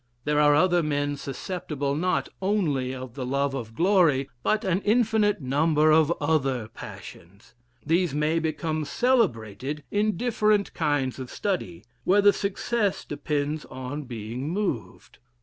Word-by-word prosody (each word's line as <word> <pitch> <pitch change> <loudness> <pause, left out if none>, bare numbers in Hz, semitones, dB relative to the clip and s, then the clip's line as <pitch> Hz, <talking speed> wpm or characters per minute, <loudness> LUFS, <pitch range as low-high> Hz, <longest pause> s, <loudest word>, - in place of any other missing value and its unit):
There 150 +1 +1
are 145 -1 +5
other 175 +2 +4
men 145 -2 -1
susceptible 140 0 -4
not 180 +5 0
Only 160 -11 0
of 130 -2 -7
the 130 0 -5
love 140 +2 0
of 115 -4 -6
glory, 165 - +3
but 215 - +1
an 185 +1 +1
infinite 215 -3 +2
number 150 +3 +3
of 155 0 +4
other 135 -7 0
passions: 100 +7 -12 0.3
these 170 +2 +2
may 150 +3 +1
become 155 0 -2
celebrated 145 - 0
in 210 -2 +1
different 215 -3 +1
kinds 145 -5 0
of 130 -2 -6
study, 100 - -3 0.2
where 195 +8 +4
the 205 0 +7
success 205 +1 -1
depends 150 +1 -2
on 130 +3 -6
being 120 +3 -5
moved. 180 - -4
150 Hz, 135 wpm, -26 LUFS, 135-185 Hz, 0.3 s, the